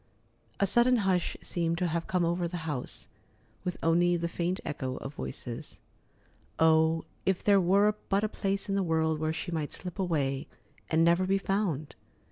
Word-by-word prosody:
A 200 - +4
sudden 240 +5 +5
hush 180 -3 +1
seemed 170 -1 -1
to 180 - 0
have 170 0 -1
come 180 -2 +1
over 170 +1 0
the 170 -1 -5
house, 145 -6 -4 0.6
with 180 - -3
only 175 +2 +3
the 170 0 -1
faint 175 +2 -2
echo 130 -3 -3
of 135 - -7
voices. 120 -4 -7 0.8
Oh, 160 0 +4 0.2
if 190 -1 0
there 200 -2 +5
were 200 +4 +4 0.2
but 200 +2 +2
a - - +2
place 195 -2 -2
in 195 - -1
the 200 - +2
world 160 -3 +1
where 155 0 0
she 175 +2 -4
might 155 -3 -2
slip 180 +1 -7
away 145 -6 0 0.4
and 160 +1 +3
never 170 +2 +3
be 195 +1 +3
found! 195 -7 -1
170 Hz, 175 wpm, -29 LUFS, 160-190 Hz, 0.8 s, sudden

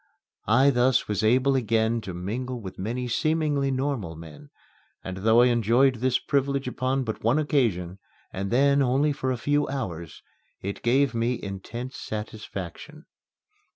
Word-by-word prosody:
I 130 +6 +5
thus 125 -1 +2
was 105 -1 -1
able 130 +5 +3
again 115 -1 +1
to 95 -4 -7
mingle 120 +8 -4
with 95 -4 -9
many 120 +6 -3
seemingly 150 +1 +1
normal 130 - -2
men, 85 - -12 0.5
and 95 0 -6
though 110 +4 +4
I - - +6
enjoyed 120 +3 +3
this 130 +1 +2
privilege 140 -1 -1
upon 130 +1 -1
but 110 -3 -5
one 115 +6 +3
occasion, 105 - 0 0.3
and 95 +1 -3
then 140 +4 +3
only 135 +3 +2
for 130 -2 -2
a 125 - -1
few 145 +4 +1
hours, 85 - -5 0.4
it 100 +1 -5
gave 130 +2 +2
me 115 +1 0
intense 115 +6 -6
satisfaction. 110 - -7
125 Hz, 150 wpm, -26 LUFS, 105-135 Hz, 0.5 s, I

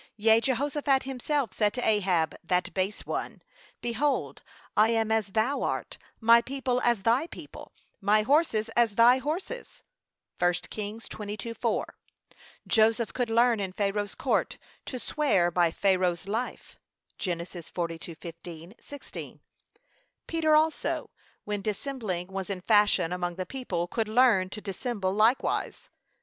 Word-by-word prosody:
Yea, 220 +1 +5
Jehoshaphat 275 +2 +1
himself 270 -2 -2
said 210 0 +1
to 250 - -1
Ahab, 185 -7 +2
that 180 +1 0
base 195 +2 -2
one: - - -4 0.4
Behold, 250 +5 -1 0.3
'I 215 +1 +5
am 225 -1 +1
as 220 -2 +2
thou 220 +8 0
art, - - -3 0.2
my 230 +1 +6
people 255 0 -2
as 235 -5 +2
thy 240 +9 +3
people, - - -11 0.3
my 210 +2 +3
horses 235 -5 +2
as 225 -2 +2
thy 240 +3 +6
horses.' 345 - -5 0.6
(1 175 0 +3 0.2
Kings 215 +1 -6
22:4) 215 +2 -3 0.8
Joseph 225 0 +2
could 245 -2 -1
learn 230 0 +4
in 190 -2 -3
Pharaoh's 205 0 -1
court, - - 0 0.3
to 255 - -4
'swear 235 - +1
by 175 -1 +3
Pharaoh's 185 0 +1
life.' 225 +5 -4 0.4
(Gen. 180 -3 -1
42:15, 170 0 -7
16) 285 -1 -9 0.9
Peter 315 -2 +2
also, 315 +1 +1 0.3
when 205 -1 -3
dissembling, 210 -4 -3
was 195 0 -5
in 190 -2 -3
fashion 205 -4 +3
among 175 -1 -2
the 185 0 -4
people, 190 -10 -3
could 220 +4 -1
learn 215 -5 +4
to 210 - -7
dissemble 200 -1 -2
likewise. 220 +5 +1
215 Hz, 130 wpm, -28 LUFS, 190-250 Hz, 0.9 s, my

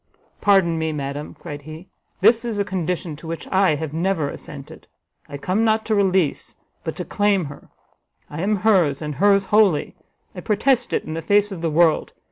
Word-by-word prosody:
"Pardon 185 -5 +3
me, 160 0 -1
madam," 145 0 -5
cried 145 -1 -8
he, 155 +5 -10 0.3
"this 230 0 +5
is 230 -3 -3
a 200 - 0
condition 180 -3 -3
to 165 - -11
which 165 0 -6
I 190 -4 +3
have 150 0 -5
never 165 -3 0
assented. - - -11 0.4
I 145 - -6
come 185 +9 0
not 220 0 +2
to 220 - 0
release, 190 -6 +1 0.3
but - - -4
to - - -5
claim 205 -4 +1
her! 140 0 -11 0.6
I 150 +2 -6
am 210 +3 +1
hers, 175 -11 +3
and 150 0 -4
hers 200 +4 +3
wholly! 205 -8 +3 0.4
I - - -8
protest 235 +4 +1
it - - 0
in 155 - -6
the 165 - -4
face 205 +5 +2
of 185 -4 -6
the 165 - 0
world! 160 +1 +2
180 Hz, 190 wpm, -22 LUFS, 155-205 Hz, 0.6 s, this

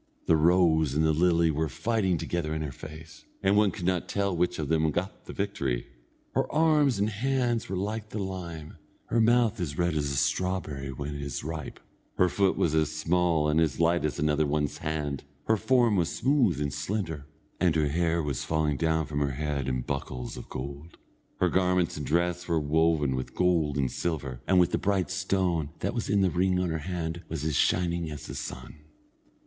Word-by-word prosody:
The 80 - +4
rose 80 -3 +3
and 80 +1 +3
the 80 - +3
lily 85 0 +3
were 80 +1 -1
fighting 100 - 0
together 80 -1 -2
in 80 - -2
her 75 - -4
face, 80 +2 -11 0.2
and 95 +1 +4
one 105 -1 +5
could 90 -1 -6
not 90 -1 0
tell 100 -2 0
which 90 +1 0
of 75 - -2
them 80 +1 +2
got 95 +7 -4
the - - -7
victory. 70 -12 -2 0.5
Her - - 0
arms 150 -5 +3
and 100 +1 +1
hands 120 0 0
were 95 - -2
like 105 +3 -3
the - - -6
lime, 90 -6 -5 0.3
her 115 - +3
mouth 115 -1 +3
as 75 -4 -3
red 85 -1 +1
as 75 -2 0
a 70 - -2
strawberry 75 -2 -1
when 70 +2 -5
it 70 - -5
is 70 0 -4
ripe, 80 -1 -6 0.4
her 90 - +4
foot 95 +1 +1
was 80 - +1
as 80 -1 +2
small 80 0 +1
and 75 +2 +3
as 75 -4 0
light 85 0 +3
as 75 - -1
another 75 0 +1
one's 75 0 -1
hand, 75 -3 -3 0.2
her 110 - +3
form 120 0 +3
was 85 -2 +1
smooth 130 - +2
and 70 -1 -2
slender, 80 -1 -3 0.3
and 85 -3 +3
her 75 -2 +2
hair 85 +1 +1
was 70 -3 -2
falling 80 -2 0
down 80 0 +1
from 70 0 -3
her 70 -2 0
head 70 -1 -2
in 65 -1 -1
buckles 65 -2 -4
of - - -9
gold. 70 +5 -7 0.4
Her - - +3
garments 90 -2 +2
and 75 - -5
dress 85 +2 0
were 85 -2 +2
woven 75 -2 +2
with 65 0 -4
gold 85 -6 +2
and 65 -2 0
silver, 70 -7 -3
and 95 -1 +5
the 90 - -2
bright 95 -2 0
stone 95 -5 0
that - - -1
was 115 - -3
in 100 -1 +3
the 95 -2 +3
ring 90 +1 +2
on 90 -1 0
her 80 - -2
hand 85 -1 -3
was 80 -2 -4
as 80 -2 -1
shining 85 +2 +1
as 75 -2 -7
the - - -7
sun. - - -7
80 Hz, 205 wpm, -28 LUFS, 75-95 Hz, 0.5 s, one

